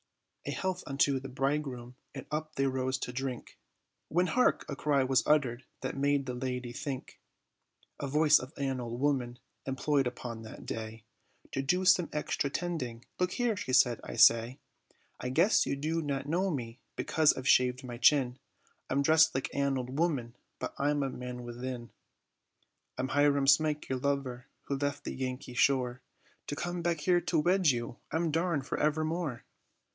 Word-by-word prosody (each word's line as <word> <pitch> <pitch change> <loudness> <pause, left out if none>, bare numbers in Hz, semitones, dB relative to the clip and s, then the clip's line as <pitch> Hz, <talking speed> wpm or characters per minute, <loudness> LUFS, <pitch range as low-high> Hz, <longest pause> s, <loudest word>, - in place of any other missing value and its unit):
"A - - -1
health 185 -1 -2
unto 140 -1 +2
the 135 +1 -8
bridegroom," 135 -2 -2 0.2
and - - -6
up 155 0 -3
they 135 - +1
rose 130 0 0
to 125 - -5
drink; 130 -2 -5 0.5
When 180 +3 +2
hark! 250 +7 +2
a - - -4
cry 140 -3 +2
was 130 0 +3
uttered 130 -5 +2 0.2
that 130 - -3
made 140 0 +1
the 125 - -3
lady 125 -1 -4
think; 140 0 -6 0.8
A 140 - -3
voice 150 +2 +5
of 130 +2 -8
an 135 -2 -1
old 120 0 -5
woman, 130 -4 0 0.3
employed 135 0 +1
upon 120 -2 -6
that 110 - -10
day, 110 0 -6 0.5
To 135 - -1
do 180 +7 +1
some 180 -2 +5
extra 150 -1 -1
tending, 135 -9 -4
"look 180 0 +1
here," 240 -3 +1
said 125 - +3
she, - - -7
"I - - -6
say, 115 +3 +5 0.6
I 125 - -3
guess 170 +11 +3
you - - 0
do 160 +4 -1
not 140 -2 -3
know 180 +5 +1
me 120 -6 -4 0.2
because 155 -1 +3
I've 130 +1 -4
shaved 125 -1 +4
my 120 -2 -7
chin, 125 -1 +4 0.5
I'm 140 +1 +1
dressed 160 +1 +5
like 130 - -2
an 140 -1 +1
old 130 +3 -4
woman, 135 -9 0 0.2
but - - -5
I'm 145 0 +1
a 135 - -2
man 125 -1 -6
within; 120 0 -6 1.1
I'm 130 +1 -2
Hiram 145 0 +3
Smike, 150 +2 +3
your 130 -1 -2
lover, 135 -3 -2 0.2
who 140 - -2
left 145 +1 -2
the - - -4
Yankee 130 -1 -4
shore, 130 -1 +2 0.5
To 145 - -3
come 175 +3 -3
back 170 -2 0
here 175 +3 +3
to 170 - 0
wed 180 +2 +3
you, 120 -2 -1
I'm 160 +1 0
darned 165 -3 0
for - - -3
evermore. 155 -3 -1
135 Hz, 175 wpm, -31 LUFS, 125-150 Hz, 1.1 s, voice